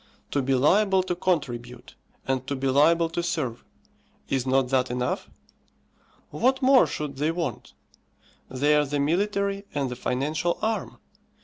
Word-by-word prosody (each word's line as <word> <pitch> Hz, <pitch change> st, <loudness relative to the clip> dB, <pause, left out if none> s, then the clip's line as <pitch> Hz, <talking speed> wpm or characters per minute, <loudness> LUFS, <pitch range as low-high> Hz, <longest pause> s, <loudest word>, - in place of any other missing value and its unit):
To 140 Hz, -, +1 dB
be 135 Hz, 0 st, +1 dB
liable 190 Hz, +8 st, +3 dB
to 180 Hz, -1 st, -2 dB
contribute, 125 Hz, -9 st, -3 dB, 0.3 s
and 130 Hz, -1 st, -1 dB
to 140 Hz, -, -2 dB
be 135 Hz, 0 st, -4 dB
liable 165 Hz, +5 st, +4 dB
to 170 Hz, +1 st, -2 dB
serve; 150 Hz, -9 st, -3 dB, 0.7 s
is 130 Hz, -1 st, -1 dB
not 130 Hz, -1 st, +2 dB
that 130 Hz, -1 st, +1 dB
enough? 125 Hz, 0 st, -2 dB, 1.0 s
What 255 Hz, -, +1 dB
more 265 Hz, -1 st, +5 dB
should 145 Hz, -3 st, -5 dB
they 150 Hz, +3 st, 0 dB
want? 165 Hz, -8 st, -4 dB, 0.8 s
They 145 Hz, +4 st, +2 dB
are 150 Hz, -, +4 dB
the 145 Hz, +1 st, -2 dB
military 200 Hz, +6 st, 0 dB
and 135 Hz, -3 st, -1 dB
the -, -, -4 dB
financial 150 Hz, +8 st, -1 dB
arm. 220 Hz, 0 st, -2 dB
145 Hz, 145 wpm, -25 LUFS, 130-175 Hz, 1.0 s, more